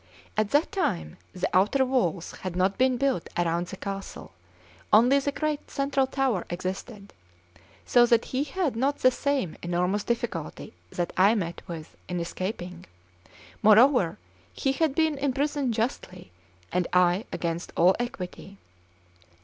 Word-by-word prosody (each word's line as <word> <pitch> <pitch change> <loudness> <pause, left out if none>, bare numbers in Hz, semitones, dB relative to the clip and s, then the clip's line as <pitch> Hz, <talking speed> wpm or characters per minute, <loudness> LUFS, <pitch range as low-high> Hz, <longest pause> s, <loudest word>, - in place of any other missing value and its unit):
At 215 -1 +1
that 290 +6 +2
time 80 - -2
the 180 - -2
outer 215 +9 +4
walls 195 -10 0
had 185 -2 -4
not 185 +2 +2
been 255 0 +2
built 265 -8 0
around 175 0 0
the 190 - -8
castle; 195 0 -6 0.6
only 245 +6 +6
the 285 +1 -1
great 305 0 -3
central 275 -1 0
tower 265 -8 0
existed; 190 +3 -6 0.7
so 240 -1 +5
that 235 -1 +3
he 270 +3 +1
had 305 -3 -1
not 275 +5 +1
the 255 - +4
same 270 - -1
enormous 180 +4 0
difficulty 230 - -4 0.2
that 175 - -3
I 200 +4 +5
met 170 -5 -3
with 165 -2 -8
in 180 -1 -2
escaping; 180 0 -5 0.8
moreover, 220 - +5 0.4
he 270 - 0
had 285 0 0
been 315 -3 +1
imprisoned 280 -2 0
justly, 185 - -3 0.4
and 180 -1 0
I 180 +3 +3
against 170 0 -3
all 180 +3 +5
equity. 195 -4 -6
215 Hz, 140 wpm, -27 LUFS, 180-270 Hz, 0.8 s, only